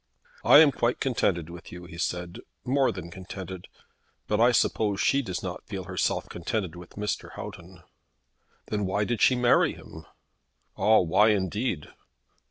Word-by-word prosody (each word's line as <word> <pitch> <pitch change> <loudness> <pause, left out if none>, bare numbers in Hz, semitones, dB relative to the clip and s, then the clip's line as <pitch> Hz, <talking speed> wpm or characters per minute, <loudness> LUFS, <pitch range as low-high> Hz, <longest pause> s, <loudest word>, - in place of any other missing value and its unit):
"I - - +8
am 150 -3 +6
quite 120 -1 0
contented 95 - 0
with 85 0 -11
you," 90 0 -9
he 85 -1 -11
said; 90 0 -3 0.3
"more 135 +1 +2
than 85 -2 -8
contented. 95 0 -8 0.6
But 105 - 0
I 120 +2 +6
suppose 105 -3 +1
she 140 - +3
does 95 -8 -5
not 90 -1 -6
feel 95 -2 -5
herself 90 -1 -1
contented 90 0 -3
with 90 0 -12
Mr. 105 0 -4
Houghton." - - -10 0.9
"Then 105 -2 -1
why 100 +2 0
did 120 +1 -2
she 130 - +5
marry 125 -1 +3
him?" 80 - -12 0.7
"Ah; 110 +1 +4
why 95 +5 +4
indeed." 100 - -1
95 Hz, 155 wpm, -27 LUFS, 90-110 Hz, 0.9 s, I